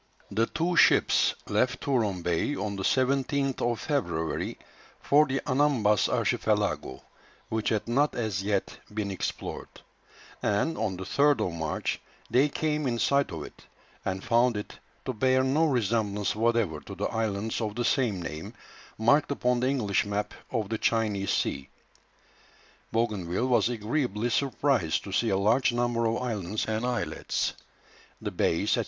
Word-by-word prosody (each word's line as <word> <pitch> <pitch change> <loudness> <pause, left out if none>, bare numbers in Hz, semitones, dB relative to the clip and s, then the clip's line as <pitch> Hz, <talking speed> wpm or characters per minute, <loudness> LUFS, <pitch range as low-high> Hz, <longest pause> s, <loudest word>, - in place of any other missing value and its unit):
The 110 +3 +1
two 175 +2 -1
ships - - +5
left 125 -1 +1
Touron 110 -10 0
Bay 90 - 0
on 105 -5 -3
the 95 - -4
17th 135 0 +1
February 85 - -2 0.4
for 150 +2 +4
the 135 0 -1
Anambas 130 -7 +3
Archipelago, 65 - 0 0.5
which 110 -1 0
had 110 -1 -1
not 140 +5 +2
as 110 -6 -1
yet 100 -1 -2
been 105 -1 -2
explored; 95 - -4 0.7
and, 105 +11 +1
on 105 -4 -2
the 95 - -5
3rd 140 +2 +3
of 90 - -3
March, 80 -2 -2 0.3
they 135 +4 +4
came 150 -1 -1
in 120 -2 0
sight 140 +4 +2
of - - -5
it, - - -13 0.4
and 95 0 -3
found 120 -1 +3
it 105 - -7 0.3
to 130 - -2
bear 130 +3 +3
no 150 +5 +3
resemblance 105 -6 0
whatever 115 -8 +1
to - - -10
the - - -2
islands 110 0 -1
of 105 -2 -2
the 120 0 -1
same 110 -7 +1
name, 80 -1 -6 0.4
marked 140 +7 +3
upon 125 -3 +1
the 130 +2 +1
English 110 -8 +1
map 105 0 -2 0.2
of 110 -5 -2
the 110 -1 -2
China 105 -4 +1
Sea. 70 -6 -1 1.2
Bougainville 105 -3 0
was 120 -2 +3
agreeably 120 0 -1
surprised 135 - +1
to 100 - -7
see 115 +4 +1
a 95 - +2
large 110 +7 +3
number 120 -1 +1
of 115 +1 0
islands 105 -4 -2
and 110 +2 -1
islets, 125 -1 -1 0.7
the - - -4
bays, 100 +6 +1
&c. - - +3
115 Hz, 150 wpm, -28 LUFS, 100-130 Hz, 1.2 s, ships